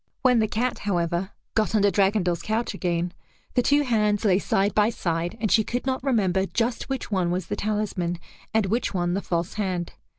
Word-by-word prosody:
When 250 -2 +5
the 220 - +2
cat, 240 +4 -1
however, 175 -1 -1 0.2
got 220 0 +1
under 205 -1 +4
Dragondel's 190 -3 +2
couch 220 +2 -1
again, 175 -2 -1 0.4
the 245 - +3
two 285 +4 +3
hands 210 -4 +1
lay 190 -2 +4
side 200 0 +1
by 210 +1 +4
side 170 -4 -2
and 215 -2 0
she 220 +2 +5
could 245 +4 -3
not 260 -1 -1
remember 195 -8 +1
just 235 +4 -1
which 270 -3 -3
one 185 -3 +1
was 180 0 -1
the - - -3
talisman 205 -5 -1 0.3
and 220 -1 +2
which 225 +1 -1
one 175 -1 0
the 195 - -1
false 170 -2 -2
hand. 180 -3 -2
205 Hz, 195 wpm, -25 LUFS, 180-225 Hz, 0.4 s, When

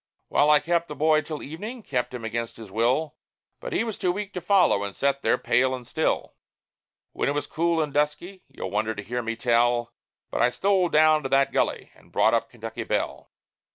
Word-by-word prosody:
Well, 145 - +3
I 150 -1 +7
kept 170 +2 0
the 150 - -7
boy 155 +2 +3
till 150 0 -6
evening 215 - -7
kept 125 -8 -2
him 125 -3 -6
against 115 +1 -4
his 110 -4 -11
will 125 +8 0 0.4
But - - -7
he - - +1
was 225 -3 -5
too 180 - +1
weak 205 +1 -5
to 180 - -4
follow, 185 - +3
and 100 -1 -5
sat 140 0 0
there - - +2
pale 130 +1 +2
and 125 -1 -10
still. - - -1 0.8
When - - -1
it - - 0
was 145 - -2
cool 170 0 0
and 150 -3 -1
dusky 150 +6 -1
you'll 130 -8 -7
wonder 110 +2 -1
to 100 - -6
hear 120 +4 -3
me 115 0 -3
tell 120 0 +1 0.4
But - - -1
I 120 - +5
stole 190 +5 +1
down 155 0 +5
to 135 - -4
that 135 0 +3
gully, - - -1
and - - -22
brought 110 - +3
up 115 0 +1
Kentucky 115 -1 -7
Belle. - - -3
140 Hz, 215 wpm, -25 LUFS, 120-165 Hz, 0.8 s, I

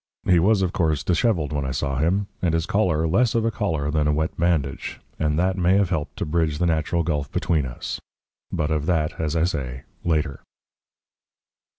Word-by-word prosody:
He 90 -2 +5
was, 100 +3 +3
of 90 - -1
course, 80 -4 +1
dishevelled 85 - +1
when 70 -1 -1
I 65 - -2
saw 70 +1 -1
him, 95 +6 +2 0.2
and 85 -3 +1
his 80 0 0
collar 90 -6 +1
less 115 +9 +2
of 115 -1 +2
a 115 - +2
collar 80 -9 -1
than 75 -1 +1
a - - +3
wet 80 +2 -1
bandage, 80 -5 -1 0.2
and 75 -1 +1
that 95 +2 +1
may 90 +2 +4
have 100 -2 +2
helped 80 -4 -2
to - - -2
bridge 80 -1 0
the 90 - +1
natural 85 +1 +1
gulf 75 -4 -2
between 80 -6 0
us - - -5 0.5
but 75 0 -1
of 75 -1 -1
that, 80 -4 0
as 80 0 -1
I 80 - +2
say, 65 -8 -2 0.2
later. 75 -4 0
80 Hz, 200 wpm, -24 LUFS, 75-90 Hz, 0.5 s, He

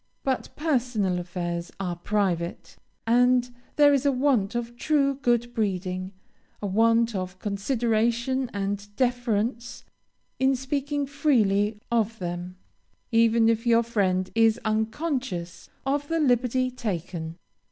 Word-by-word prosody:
But 265 -2 -1
personal 245 - 0
affairs 175 -1 -4
are 180 -3 -2
private; 175 -3 -2 0.3
and 245 +1 +3 0.2
there 290 -1 +6
is 275 -2 +2
a 285 - +3
want 250 -6 +1
of 240 0 -3
true 275 +1 +2
good 240 -1 +1
breeding, 185 -4 -2 0.5
a - - -5
want 230 +3 +3
of 185 -2 -4
consideration 235 +4 0
and 200 0 -3
deference, 240 -1 -1 0.6
in 265 0 +3
speaking 280 +2 -2
freely 220 -8 +2
of 225 -1 +1
them, 175 0 -5 0.6
even 230 0 +4
if 230 +1 +1
your 235 0 +5
friend 190 -5 0
is 225 0 +3
unconscious 220 - -2 0.2
of 285 +1 0
the 330 +1 0
liberty 255 -2 +2
taken. 175 -8 -4
230 Hz, 120 wpm, -26 LUFS, 195-255 Hz, 0.6 s, there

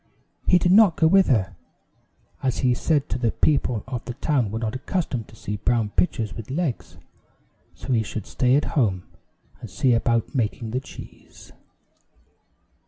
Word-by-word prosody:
He 180 - +6
did 175 0 +2
not 200 -4 +6
go 160 - +3
with 190 +4 +5
her, 95 -8 +1 0.9
as 130 -2 -1
he 125 - +4
said 145 +3 0
the 120 -2 -1
people 125 -7 +1
of 125 -3 -5
the 120 - -6
town 140 -5 0
were 110 - -4
not 110 -1 -3
accustomed 130 - -3
to - - -16
see 105 -1 -5
brown 115 0 0
pitchers 110 - 0
with 115 0 -9
legs, 145 -3 -3 0.8
so 130 - -4
he 115 - +3
should 110 -1 -5
stay 125 0 +1
at 145 - +2
home 100 - +1 0.6
and - - -9
see 130 -2 +1
about 115 -1 0
making 115 -2 -2
the 125 - -1
cheese. - - -13
125 Hz, 165 wpm, -23 LUFS, 110-145 Hz, 0.9 s, He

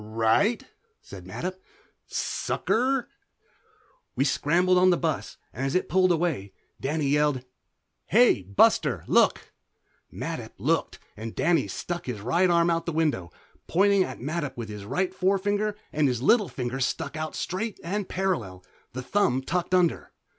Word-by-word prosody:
"Right," 115 - +1 0.4
said - - -12
Mattup. 185 +1 -5 0.5
"Sucker." 255 +2 -1 1.1
We - - +2
scrambled 175 +6 +2
on 185 0 +5
the 175 - +3
bus 160 -3 -2 0.2
and 130 - -4
as 135 +3 -1
it 185 - +1
pulled 185 0 +4
away 160 - -1 0.3
Danny 150 +2 -1
yelled 145 -3 +1 0.6
"Hey, 235 - +5
Buster, 95 +2 +2
look!" - - +2 0.6
Mattup - - -5
looked, - - 0 0.2
and 110 +1 -7
Danny 170 +1 +2
stuck 175 -4 -5
his 120 -4 -4
right 170 - +2
arm 170 0 +3
out 165 0 -1
the - - 0
window, 150 - 0 0.4
pointing 200 +2 +4
at - - -6
Mattup 145 +1 -3
with 115 -2 -5
his 105 -1 -7
right 185 - -1
forefinger 205 +3 0 0.2
and 150 -1 +2
his 125 -3 0
little 210 - +4
finger 125 -1 -4
stuck 140 +3 -2
out 155 0 -4
straight 195 +4 -3
and 195 +3 -3
parallel, 115 - -2 0.3
the 130 +1 -5
thumb 135 -5 +1
tucked 180 +4 0
under. 180 -2 +1
165 Hz, 145 wpm, -26 LUFS, 130-185 Hz, 1.1 s, on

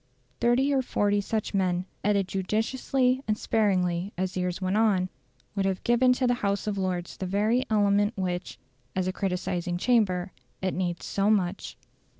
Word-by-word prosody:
Thirty 255 +4 +3
or 270 - +3
forty 205 -4 +1
such 215 +1 -2
men, 180 -2 +1 0.2
added 200 -2 +2
judiciously 250 +7 0
and 215 -1 +1
sparingly 185 -4 +1
as 185 0 -2
years 180 -1 -1
went 185 +1 -1
on, 200 -4 +2 0.4
would 195 -2 0
have 190 -1 -2
given 240 +2 +4
to 255 +1 0
the 245 - +3
House 200 0 0
of 210 -1 -1
Lords 185 -2 -3
the 190 - -3
very 215 +7 +1
element 205 0 +2
which, 180 -1 -3 0.4
as 185 -1 0
a 185 - -1
criticising 180 -2 -2
chamber, 185 -4 +2 0.3
it 190 -1 -1
needs 175 -2 -2
so 200 +1 +1
much. 195 -3 0
200 Hz, 160 wpm, -27 LUFS, 185-220 Hz, 0.4 s, given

